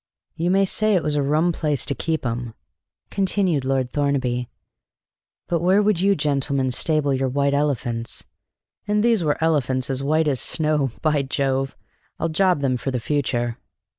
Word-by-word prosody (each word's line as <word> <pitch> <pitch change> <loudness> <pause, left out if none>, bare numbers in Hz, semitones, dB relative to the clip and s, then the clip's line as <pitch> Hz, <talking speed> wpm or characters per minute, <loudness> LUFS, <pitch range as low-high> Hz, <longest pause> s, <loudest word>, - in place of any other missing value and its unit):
"You 170 +2 -1
may 195 +1 +3
say 215 +2 +2
it 180 - +1
was 150 - -1
a 145 - +2
rum 155 +5 +2
place 150 -5 -1
to - - -1
keep 160 +3 -2
'em," 120 -1 -3 0.6
continued 190 -6 0
Lord 130 -1 -1
Thornaby. 130 -4 -1 1.0
"But 170 - 0
where 185 +3 +4
would 205 -4 +2
you 200 +1 +3
gentlemen 140 -3 0
stable 150 +1 +1
your 130 0 0
white 140 +2 +1
elephants? 120 -5 -2 0.6
And 210 0 +1
these 230 -6 +3
were 150 -2 +1
elephants 135 -5 0
as 130 0 -2
white 155 +3 +1
as 135 -4 +1
snow; 150 -4 +1
by 155 -2 +2
Jove, 135 0 -1 0.4
I'll 165 - 0
job 180 -1 +2
them 130 -2 +1
for 130 - -4
the 125 -2 -1
future!" 120 -2 -1
145 Hz, 165 wpm, -22 LUFS, 130-165 Hz, 1.0 s, where